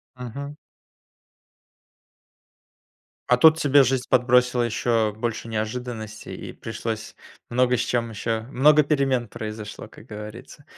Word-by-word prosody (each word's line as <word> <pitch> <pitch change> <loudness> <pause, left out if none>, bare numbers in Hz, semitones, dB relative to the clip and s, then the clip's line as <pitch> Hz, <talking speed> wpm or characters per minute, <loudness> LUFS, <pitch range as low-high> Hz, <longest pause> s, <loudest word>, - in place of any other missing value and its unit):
Мгм. 140 +4 -7 2.7
А 125 - +5
тут 160 +4 +7
тебе 145 -2 +5
жизнь 130 0 0
подбросила 125 0 +3
еще 115 -1 +1
больше 115 0 -3
неожиданностей, 110 -1 -5
и - - -8
пришлось 115 -1 -5 0.3
много 125 +1 +2
с - - -1
чем 115 -2 -1
еще, 110 +1 -2
много 150 +3 +5
перемен 135 -5 +1
произошло, 110 0 -7
как - - -16
говорится. 105 +7 -10
120 Hz, 110 wpm, -24 LUFS, 110-130 Hz, 2.7 s, тут